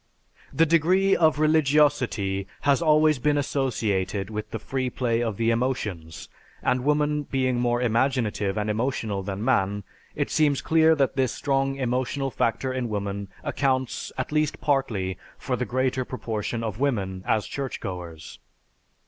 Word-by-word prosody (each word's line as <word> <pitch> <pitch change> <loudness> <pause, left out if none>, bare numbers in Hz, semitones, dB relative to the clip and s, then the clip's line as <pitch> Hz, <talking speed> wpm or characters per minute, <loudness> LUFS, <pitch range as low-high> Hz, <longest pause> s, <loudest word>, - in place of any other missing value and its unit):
The 165 - +3
degree 180 +5 +3
of 160 -3 +3
religiosity 145 -10 +2
has 140 -2 +3
always 155 -2 +4
been 150 +3 +2
associated 110 -8 -1
with 105 0 -5
the - - -4
free 130 +3 -2
play 120 -2 0
of 110 -4 -2
the 115 0 +2
emotions 105 -10 -3 0.4
and 125 0 +1
woman 150 +1 +1
being 130 -3 0
more 120 0 +1
imaginative 115 -4 0
and 105 0 -1
emotional 110 -2 -1
than 100 +2 -4
man, 105 -5 +1 0.3
it - - -2
seems 145 -3 +3
clear 160 0 +4
that 140 -3 +1
this 130 -3 +1
strong 135 0 0
emotional 130 +1 -1
factor 125 +3 -1
in 125 -2 -2
woman 100 -1 -3 0.2
accounts, 135 -4 -1
at 130 - -3
least 150 -1 0
partly, 105 - 0 0.2
for 130 - -2
the 125 - -2
greater 130 +1 0
proportion 115 -2 -4
of 110 -1 -4
women 100 -9 -1
as 110 -2 +1
churchgoers. 90 - -6
125 Hz, 145 wpm, -25 LUFS, 105-140 Hz, 0.4 s, always